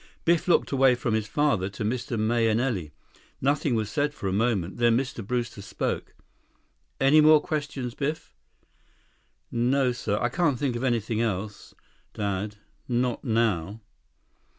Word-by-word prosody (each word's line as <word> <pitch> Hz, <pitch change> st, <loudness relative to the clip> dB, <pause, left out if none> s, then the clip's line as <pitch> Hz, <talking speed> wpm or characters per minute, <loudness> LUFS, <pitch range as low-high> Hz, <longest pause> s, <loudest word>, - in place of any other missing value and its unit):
Biff 170 Hz, +2 st, +2 dB
looked 175 Hz, -, +3 dB
from 130 Hz, -4 st, +3 dB
his 110 Hz, -1 st, 0 dB
father 115 Hz, -8 st, +1 dB
to 100 Hz, +2 st, -6 dB
Mr. 120 Hz, 0 st, -2 dB
Mahenili. 115 Hz, -, +1 dB, 0.5 s
Nothing 140 Hz, -1 st, +1 dB
was 110 Hz, -2 st, 0 dB
said 145 Hz, 0 st, 0 dB
for 100 Hz, -, -4 dB
a 95 Hz, -, -1 dB
moment. 100 Hz, -4 st, 0 dB
Then 120 Hz, -1 st, +4 dB
Mr. 130 Hz, -3 st, -3 dB
Brewster 120 Hz, -1 st, -3 dB
spoke. 100 Hz, -, -4 dB, 0.8 s
"Any 145 Hz, +3 st, +6 dB
more 155 Hz, 0 st, +7 dB
questions, 145 Hz, -5 st, -4 dB
Biff?" 150 Hz, +4 st, -4 dB, 1.2 s
"No, 125 Hz, +2 st, +2 dB
sir. 120 Hz, -1 st, -1 dB
Can't 145 Hz, -1 st, +1 dB
think 130 Hz, -2 st, -1 dB
of 120 Hz, -, -3 dB
anything 115 Hz, -3 st, 0 dB
else, 105 Hz, -2 st, -4 dB, 0.4 s
Dad. 105 Hz, 0 st, -2 dB, 0.3 s
Not 125 Hz, -1 st, 0 dB
now." 110 Hz, -, 0 dB
120 Hz, 130 wpm, -26 LUFS, 110-135 Hz, 1.2 s, more